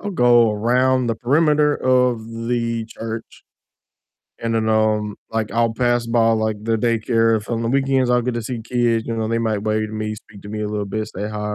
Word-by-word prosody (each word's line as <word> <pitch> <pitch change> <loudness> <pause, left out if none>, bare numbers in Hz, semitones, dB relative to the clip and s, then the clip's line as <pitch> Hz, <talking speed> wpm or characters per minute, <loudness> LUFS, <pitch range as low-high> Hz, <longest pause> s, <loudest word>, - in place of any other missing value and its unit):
I'll 205 - -4
go 120 - +4
around 125 +4 +2
the 115 - 0
perimeter 150 +4 +2
of 125 -3 +1 0.2
the 115 -2 -1
church 115 0 -8 1.0
and 115 0 -1
then, 110 -1 0
um, 110 -1 +1
like, 110 -1 -2
I'll 115 -1 +1
pass 120 0 +1
by, 115 -1 +3
like, 110 -1 -1
the 115 0 0
daycare, 115 0 +2
if 105 - -10
on 115 -1 -1
the 115 - -1
weekends 135 0 +1
I'll 125 0 +3
get 125 0 -2
to 120 - -3
see 120 +1 -4
kids, 120 -1 0
you 115 - -2
know, 110 -1 -1
they 115 +1 0
might 110 -3 -1
wave 110 0 0
to 110 - -10
me, 110 0 -3
speak 105 -1 -15
to 100 - -10
me 110 0 -5
a 105 - -2
little 105 -1 -3
bit, 110 +2 -3
say 105 +3 -5
hi, 105 0 -4
115 Hz, 220 wpm, -20 LUFS, 110-120 Hz, 1.0 s, go